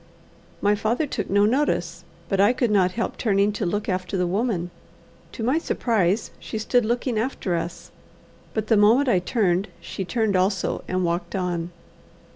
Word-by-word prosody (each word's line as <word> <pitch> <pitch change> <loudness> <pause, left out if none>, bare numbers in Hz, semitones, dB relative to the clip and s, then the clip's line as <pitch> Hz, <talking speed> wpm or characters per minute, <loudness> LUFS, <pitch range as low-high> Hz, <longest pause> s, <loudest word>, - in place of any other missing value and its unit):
My 205 0 +3
father 220 +8 0
took 280 - -4
no 205 +1 +4
notice, 270 +7 0 0.2
but 195 -1 +1
I 205 +5 +5
could 245 -3 0
not 185 -3 +3
help 235 - -3
turning 200 -2 +2
to 205 -2 -2
look 205 +4 -2
after 185 0 -2
the 180 - +1
woman. 185 -2 -1 0.6
To 225 - -5
my 260 +7 +2
surprise 220 - 0
she - - -6
stood 240 +2 +1
looking 240 0 0
after 220 -7 -2
us, 165 +1 -5 0.6
but 220 -1 0
the 220 -1 +3
moment 230 +7 +5
I 185 - +4
turned, 185 -1 +1
she 195 - -5
turned 220 +1 0
also 185 0 0
and 185 -1 0
walked 175 +1 -2
on. 175 -2 -2
205 Hz, 170 wpm, -24 LUFS, 185-230 Hz, 0.6 s, I